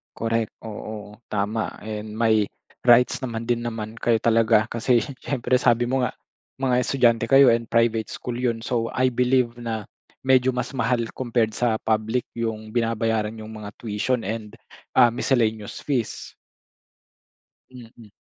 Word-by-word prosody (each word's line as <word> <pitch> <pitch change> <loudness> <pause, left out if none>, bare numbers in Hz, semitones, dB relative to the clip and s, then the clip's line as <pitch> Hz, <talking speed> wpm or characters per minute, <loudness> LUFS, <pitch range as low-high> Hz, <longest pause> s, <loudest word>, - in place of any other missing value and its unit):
Correct. 115 -1 -1 0.2
Oo, 105 -1 -7 0.2
tama 105 +2 -1
and 105 0 -6
may 110 -1 +3 0.4
rights 125 +2 +5
naman 115 -2 -4
din 120 -1 0
naman 110 -2 -5
kayo 115 0 +1
talaga 110 -1 +3
kasi 120 +1 +2 0.2
siyempre 130 -2 0
sabi 120 -1 +3
mo 130 +1 +1
nga 125 - 0 0.5
mga 130 -2 +1
estudyante 120 -3 +2
kayo 135 0 +8
and 115 -1 -2
private 115 -1 +2
school 120 -1 -5
yun. 120 -2 -1
So, 115 -1 -1
I 130 0 +2
believe 125 -1 +1
na 110 -3 -4 0.3
medyo 130 -1 +4
mas 125 - -2
mahal 120 0 +1 0.2
compared 120 -3 0
sa 115 -3 +1
public 110 +2 0
yung 110 -2 -3
binabayaran 115 -2 0
niyong 110 0 -8
mga 105 -1 -7
tuition 115 +3 -1
and 110 -1 -5 0.4
ah, 120 - +7
miscellaneous 110 -4 0
fees. 130 -6 -3 1.4
Mm. 115 -4 -14
115 Hz, 140 wpm, -24 LUFS, 110-125 Hz, 1.4 s, kayo